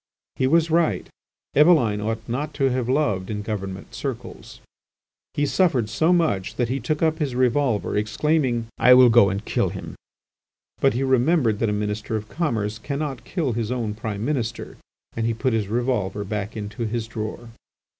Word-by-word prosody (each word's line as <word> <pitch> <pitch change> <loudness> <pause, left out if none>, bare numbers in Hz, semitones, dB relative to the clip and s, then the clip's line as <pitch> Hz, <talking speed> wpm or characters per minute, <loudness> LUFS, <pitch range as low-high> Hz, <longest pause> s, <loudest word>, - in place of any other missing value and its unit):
He 130 - +1
was 165 +3 +3
right—Eveline 150 -6 +1
ought 110 +1 -3
not 140 +6 -3
to 135 -2 +2
have 125 -1 -1
loved 105 -10 0
in 105 -1 -3
government 100 -3 -5
circles. - - -6 0.8
He 145 - +1
suffered 140 - +2
so 160 +9 +2
much 155 - +1
that 120 -2 0
he 135 +2 -1
took 150 +6 -2
up 160 0 +1
his 140 -5 -2
revolver, 125 -2 +1
exclaiming: 120 +3 0
"I 125 0 +7
will 125 -2 +7
go 115 -4 +6
and 100 +3 -4
kill - - 0
him!" - - -7 0.9
But - - +3
he 130 - 0
remembered 130 -3 +2
that 115 - +1
a - - 0
Minister 105 +1 -2
of 110 0 -4
Commerce 110 -10 -2
cannot 140 +1 -4
kill 155 -9 -1
his 115 0 -2
own 115 -4 -2
Prime 105 0 -4
Minister, 125 -6 -3 0.4
and 115 0 -1
he 115 - 0
put 130 +2 0
his 110 -3 0
revolver 110 -3 -1
back 105 +2 -4
into 105 +2 -4
his 115 0 -3
drawer. 110 +1 -6
120 Hz, 170 wpm, -23 LUFS, 105-140 Hz, 0.9 s, I